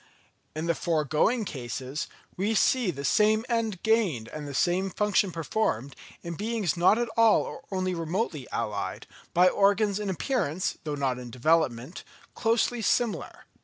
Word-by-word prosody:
In 155 +1 -3
the 170 - +2
foregoing 165 - +1
cases, 130 - -5 0.3
we 205 +4 0
see 245 0 +3
the 140 -4 -4
same 215 - +3
end 225 -6 -1
gained 205 - +1
and 150 -1 -7
the 140 - -6
same 185 +4 +1
function 205 -1 +1
performed, 155 - -2 0.3
in 170 - -4
beings 210 -1 -1
not 180 +5 +4
at 240 0 0
all 225 -1 +4
or - - -7
only 185 -1 -1
remotely 165 - -2
allied, 105 -3 -3 0.3
by 180 +1 +6
organs 200 +1 +3
in 205 -2 -3
appearance, 190 - -1
though 150 -1 -2
not 135 -3 -1
in 125 -1 -8
development, 130 +2 0 0.3
closely 230 +1 +1
similar. 235 +1 -1
185 Hz, 150 wpm, -27 LUFS, 150-215 Hz, 0.3 s, by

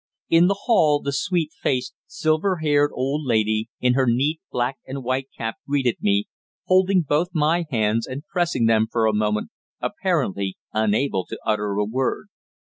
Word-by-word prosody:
In 165 +2 +5
the 200 +1 -1
hall 155 -11 +4
the 140 - -3
sweet 165 +1 0
faced, 130 -2 -1
silver 155 +5 0
haired 145 -2 +2
old 135 +4 -2
lady, 110 -3 +1
in 125 0 +3
her 130 0 +2
neat 140 +7 +1
black 125 +2 -1
and 135 0 -5
white 130 +2 -2
cap 115 -1 -4
greeted 135 -4 +1
me, 100 0 +2 0.4
holding 185 0 +3
both 150 +4 +1
my 165 +2 +2
hands 110 -2 0
and 135 +3 -6
pressing 170 -9 0
them 110 -1 +3
for 115 -2 +1
a 110 - +2
moment, 105 0 0 0.3
apparently 95 0 -1 0.2
unable 110 -1 +1
to - - -6
utter 105 -2 0
a 105 0 +1
word. 130 +4 -2
130 Hz, 165 wpm, -23 LUFS, 110-155 Hz, 0.4 s, In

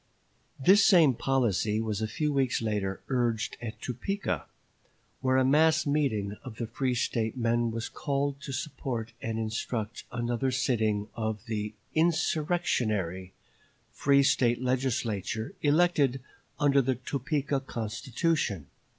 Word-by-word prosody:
This 195 +9 +6
same 170 -9 +6
policy 115 -5 +1
was 110 -2 -2
a 110 - 0
few 150 +7 -1
weeks 135 -3 +1
later 105 -4 -2
urged 120 -4 0
at 110 -2 -6
Topeka, 125 - -3 0.7
where 130 0 +2
a 130 - +4
mass 155 +3 +4
meeting 110 -9 0
of 125 -4 -8
the 120 - -2
free 130 +2 -1
State 115 0 -1
men 120 0 +1
was 115 0 -3
called 140 0 -2
to 140 - -6
support 130 -4 -4
and 110 -1 -3
instruct 110 0 -3
another 120 +2 -1
sitting 110 -5 0
of 110 -2 -3
the 105 -1 -3 0.2
"insurrectionary" 150 - 0 0.6
free 140 0 +3
State 120 -3 +3
Legislature 120 -5 -1
elected 145 -4 +3 0.4
under 140 -1 +4
the 130 0 0
Topeka 140 +3 -1
Constitution. 120 - -2
125 Hz, 125 wpm, -29 LUFS, 110-140 Hz, 0.7 s, This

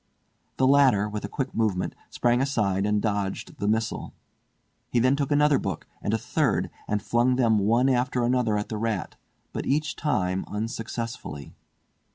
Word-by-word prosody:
The 130 - +3
latter, 130 -7 +5
with 105 0 -5
a - - -6
quick 135 -2 -3
movement, 105 -5 0 0.2
sprang 120 +1 +2
aside 105 -8 +1
and 105 0 +1
dodged 100 -3 -2
the 100 - -1
missile. 110 +1 -1 0.8
He - - 0
then 130 +3 +4
took 140 -1 -2
another 145 -1 +4
book, 95 -5 -4 0.2
and - - -1
a - - +2
third, - - 0 0.2
and 105 -1 -1
flung 120 +4 +2
them 115 -4 +3
one 115 +6 +3
after 125 -1 +1
another 120 -3 +2
at 105 - -3
the 110 - -3
rat, 110 -5 -2 0.4
but - - -4
each 145 +1 0
time 95 - 0
unsuccessfully. 115 -7 -5
115 Hz, 165 wpm, -26 LUFS, 105-130 Hz, 0.8 s, latter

